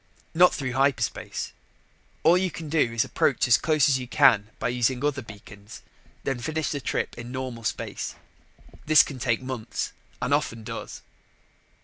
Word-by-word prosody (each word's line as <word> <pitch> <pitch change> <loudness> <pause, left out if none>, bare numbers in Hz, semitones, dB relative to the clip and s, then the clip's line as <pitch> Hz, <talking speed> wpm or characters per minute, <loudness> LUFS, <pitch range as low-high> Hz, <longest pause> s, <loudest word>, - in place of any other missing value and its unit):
Not 180 +2 +5
through 135 -3 -3
hyperspace. 135 0 -1 0.7
All 165 +2 +6
you 185 +1 +1
can 160 -1 -8
do 145 -6 +2
is 115 -1 +1
approach - - +1
as 120 - +5
close 155 -4 +3
as 135 -3 +3
you 125 - -6
can 105 -3 +4
by - - -1
using 125 +2 0
other 145 -2 0
beacons, 105 -2 -12 0.4
then 135 -2 -2
finish 155 +5 -2
the 145 - -3
trip - - -2
in 120 +1 -7
normal 130 -3 -5
space. - - -3 0.7
This 155 0 +8
can 135 -3 -8
take 120 0 0
months, 130 -4 -4 0.3
and - - 0
often 115 -1 -1
does. - - -7
130 Hz, 160 wpm, -26 LUFS, 115-150 Hz, 0.7 s, This